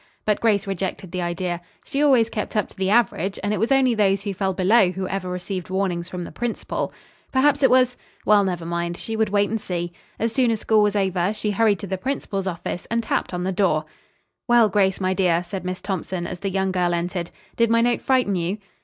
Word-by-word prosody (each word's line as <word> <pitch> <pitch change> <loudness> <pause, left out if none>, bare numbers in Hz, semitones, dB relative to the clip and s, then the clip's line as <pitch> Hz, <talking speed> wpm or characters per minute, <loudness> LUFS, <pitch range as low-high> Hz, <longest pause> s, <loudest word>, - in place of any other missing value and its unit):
But 210 -1 +2
Grace 210 -3 +2
rejected 190 -2 -4
the 185 - -2
idea. 175 0 -2 0.2
She 280 - -2
always 260 -6 +5
kept 215 -1 -4
up 210 - +1
to - - -18
the 190 0 -1
average, 200 -4 +2
and 205 +1 0
it - - -1
was 225 +4 0
only 265 -2 +4
those 200 -3 +2
who 200 - -2
fell 190 0 -1
below 190 +2 +4
who 185 +1 -4
ever 190 -1 -3
received 180 0 -4
warnings 185 -2 -1
from 180 -1 -5
the - - -8
principal. 240 -1 -3 0.4
Perhaps 285 +2 +3
it 265 - +6
was 255 -1 +4 0.3
well, 210 -1 +5
never 175 -3 -2
mind, 170 0 -2
she 225 - -5
would 220 -1 +1
wait 205 0 +2
and 225 -1 -1
see. 175 -1 -3 0.2
As 230 0 0
soon 255 -1 +3
as 225 -2 0
school 220 0 +3
was 210 0 +2
over 190 0 +1
she 210 0 -2
hurried 210 0 +3
to - - -4
the 190 -1 -3
principal's 200 -6 -3
office 175 0 -4
and 230 0 0
tapped - - -1
on 180 -1 -3
the 190 - 0
door. 175 -5 +1 0.6
"Well, 240 -3 +5
Grace, 190 -1 +2
my 185 -1 +1
dear," 180 -3 +2
said 185 +2 -6
Miss 185 0 -3
Thompson, 185 -2 -3
as 180 0 -6
the 195 - -2
young 190 0 0
girl 175 -2 +1
entered, 175 0 -3 0.3
"did 230 -1 +3
my 230 0 +4
note 240 0 +2
frighten 255 -7 +2
you?" 175 +3 -1
195 Hz, 230 wpm, -23 LUFS, 180-220 Hz, 0.6 s, it